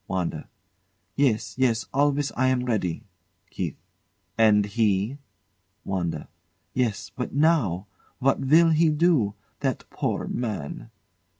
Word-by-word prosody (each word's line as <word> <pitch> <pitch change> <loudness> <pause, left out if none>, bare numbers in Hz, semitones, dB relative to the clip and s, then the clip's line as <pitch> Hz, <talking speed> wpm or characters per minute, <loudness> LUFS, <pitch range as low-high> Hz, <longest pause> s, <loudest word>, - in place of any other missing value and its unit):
WANDA. 85 -4 -3 0.7
Yes, 130 -6 +1
yes; 115 -4 +2
always 145 +1 +2
I 130 +1 +1
am 130 -1 +1
ready. 100 -9 -1 0.5
KEITH. 85 -6 -3 0.6
And 105 -2 +5
he? 105 +4 0 0.7
WANDA. 90 -3 -2 0.5
Yes 120 -5 -1
but 125 +1 -4
now! 140 - +2 0.3
What 135 +1 +2
will 165 +5 +5
he 160 +1 +4
do? 150 - +2 0.2
That 135 -3 -2
poor - - -2
man! 110 - -4
120 Hz, 110 wpm, -25 LUFS, 100-140 Hz, 0.7 s, And